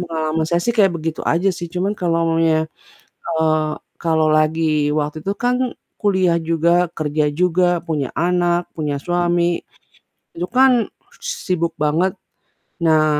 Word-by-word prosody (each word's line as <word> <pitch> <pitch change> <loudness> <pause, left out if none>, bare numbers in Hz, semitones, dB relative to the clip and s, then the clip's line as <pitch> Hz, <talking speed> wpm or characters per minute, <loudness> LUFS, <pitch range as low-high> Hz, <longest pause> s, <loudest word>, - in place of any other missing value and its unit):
pengalaman 160 -2 -1
saya 170 0 +1
sih 235 - +2
kayak 195 -4 +4
begitu 160 0 -4
aja 180 +4 +2
sih, 175 0 -6
cuman 190 +3 0
kalau 170 -2 +1
maminya, 165 -1 +3 0.8
eee, 155 -1 +1 0.3
kalau 160 -2 +2
lagi 155 -1 +2
waktu 150 +1 -2
itu 195 - 0
kan 245 +1 +1 0.4
kuliah 190 -4 +2
juga, 170 +2 +2
kerja 150 -1 0
juga, 180 +3 +2 0.2
punya 150 -5 -1
anak, 175 0 +1
punya 150 -2 -2
suami, 175 0 0 0.7
itu 175 +2 -3
kan 255 -2 +5 0.4
sibuk 185 - -2
banget, 165 +5 +2 0.7
nah 155 -2 +4
170 Hz, 130 wpm, -19 LUFS, 155-180 Hz, 0.8 s, kan